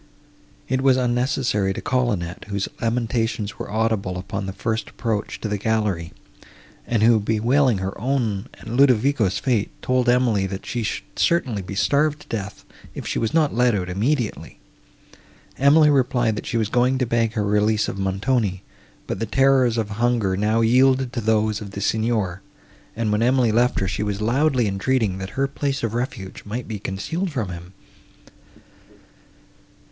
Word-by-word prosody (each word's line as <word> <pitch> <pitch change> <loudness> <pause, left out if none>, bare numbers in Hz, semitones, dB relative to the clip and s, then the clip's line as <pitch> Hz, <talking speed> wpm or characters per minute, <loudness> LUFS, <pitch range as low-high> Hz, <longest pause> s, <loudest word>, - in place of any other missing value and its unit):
It 130 +1 0
was 135 -1 +4
unnecessary 120 -5 0
to - - -5
call 125 -2 0
Annette, 85 -3 -4
whose 100 -1 -2
lamentations 115 -3 -1
were - - -5
audible 110 -4 -1
upon 95 +2 -5
the - - -3
first 110 +3 -3
approach 110 -4 -3
to - - -2
the 105 -1 -2
gallery, 105 -6 -1 0.8
and 115 -3 +1
who, 115 0 +5
bewailing 115 +4 +2
her 95 +1 -4
own 115 -6 -1
and 115 +1 -7
Ludovico's 125 -6 +3
fate, 115 -2 0
told 125 -1 +1
Emily, 120 -6 +2
that 95 0 -6
she 120 - -3
should 110 - -3
certainly 130 -12 +1
be 95 +2 -7
starved 150 +7 +1
to - - -16
death, 105 -2 -5 0.3
if - - -6
she - - -2
was 115 - -1
not 155 -3 +2
let 120 -1 +3
out 90 -2 -2
immediately. 120 +5 -2 1.0
Emily 150 +2 +6
replied, 125 -4 +2
that - - -6
she 115 - -1
was 110 -2 0
going 125 +3 +2
to 130 - 0
beg 115 -1 0
her 105 -3 -1
release 105 +1 +2
of 100 - -5
Montoni; 95 0 0 0.4
but - - -4
the 115 - -2
terrors 130 -1 +3
of 110 -2 -2
hunger 115 -3 +1
now 105 +3 +1
yielded 130 +2 +3
to 120 - -2
those 110 -1 +1
of 105 - -7
the 100 - -5
Signor, 110 -3 0 0.5
and, 110 -1 -1
when 105 +1 +1
Emily 125 -1 +3
left 120 +3 +2
her, 95 - -1
she 95 - -3
was 105 -1 -2
loudly 125 +2 +2
entreating, 100 0 0
that 95 +6 -7
her 135 0 +2
place 140 -1 -3
of 115 -2 -1
refuge 120 -6 -4
might 115 +4 -5
be 110 -2 -5
concealed 160 - -3
from 115 -9 -2
him. 90 +1 -9
115 Hz, 170 wpm, -22 LUFS, 100-125 Hz, 1.0 s, Emily